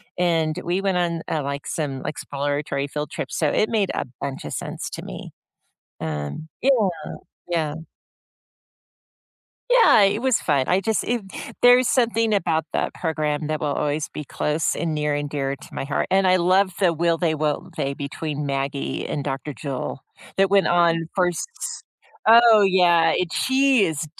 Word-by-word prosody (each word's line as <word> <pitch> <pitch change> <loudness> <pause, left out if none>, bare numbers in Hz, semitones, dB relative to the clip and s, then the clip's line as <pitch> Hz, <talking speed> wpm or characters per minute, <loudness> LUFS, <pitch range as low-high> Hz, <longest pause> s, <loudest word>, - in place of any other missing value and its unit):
and 165 -3 +1
we 180 +3 -1
went 195 -2 0
on, 170 -2 -1
uh, 155 - -1
like, 140 0 -4
some 140 -4 -4
exploratory 145 -1 -3
field 150 +1 -4
trips, - - -5
so 155 - +1
it 215 - +2
made 210 -4 +1
a - - -2 0.2
bunch 135 -1 -5
of - - -5
sense - - -5
to - - -6
me. - - -8 0.7
Um, 75 - -4
yeah. 250 -6 +4 0.6
Yeah. 160 -4 0 2.0
Yeah, - - +6
it 205 +3 +2
was 260 -3 +3
fun. 140 -3 +1
I 180 - +3
just 215 +3 0
it 240 -1 -1 0.4
there's 245 0 +6
something 230 -3 +2
about 165 -5 +1
that - - -1
program 155 -2 -2
that 155 0 -2
will 145 -2 -1
always 150 +1 -1
be 150 - -5
close 150 +2 -1
and 165 -2 -2
near 150 0 0
and 145 0 -2
dear 140 -1 -2
to - - -13
my - - -3
heart, 140 +1 -1
and 190 0 +3
I 185 0 +5
love 185 +2 +3
the 180 -4 +3
will-they, 165 0 +1
won't-they 145 -2 -2
between 145 +1 -4
Maggie 140 0 -2
and 145 - -3
Doctor 140 +1 -4
Joel 135 -2 -5 0.4
that 195 0 +4
went 195 -3 +4
on 170 -2 +2
first 180 -3 0 0.8
Oh, 230 -1 +8
yeah, 175 -4 +4
it 180 -2 -1
she 265 -4 +3
is 160 -3 -2
165 Hz, 165 wpm, -23 LUFS, 145-195 Hz, 2.0 s, Oh